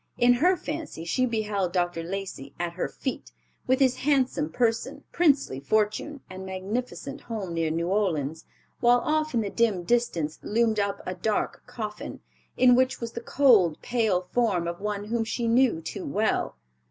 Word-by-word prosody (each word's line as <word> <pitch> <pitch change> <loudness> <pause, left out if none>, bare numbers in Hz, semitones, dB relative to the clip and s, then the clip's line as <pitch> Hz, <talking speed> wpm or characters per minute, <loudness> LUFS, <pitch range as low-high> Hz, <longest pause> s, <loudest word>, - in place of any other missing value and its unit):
In 245 0 +5
her 355 +9 +3
fancy 305 - -5
she 255 +9 +1
beheld 210 -5 -1
Dr. 175 -2 0
Lacey 175 -6 -6
at 175 -1 -2
her 180 - -2
feet, 260 - -5 0.4
with 260 +1 +3
his 260 -2 +3
handsome 260 - +1
person, 225 +4 -1
princely 285 - +2
fortune, 215 - 0
and 185 0 -8
magnificent 230 +9 -4
home 210 -7 -5
near 165 -1 0
New 165 +2 -1
Orleans, 160 -6 0 0.4
while 240 0 +5
off 310 -2 0
in 230 - +3
the 200 -2 -3
dim 215 -6 +1
distance 170 -8 0
loomed 225 0 +1
up 200 0 -1
a 185 - -3
dark 205 +4 -1
coffin, 220 -4 -6 0.4
in 250 -1 +6
which 255 +1 +2
was 235 -1 -4
the 235 - -6
cold, 225 - +4
pale 220 -7 +1
form 205 -8 +1
of 170 +2 -5
one 205 -1 -2
whom 225 +2 -1
she 230 +1 -2
knew 235 -6 +3
too 320 - -5
well. 220 -5 0
220 Hz, 165 wpm, -26 LUFS, 180-250 Hz, 0.4 s, in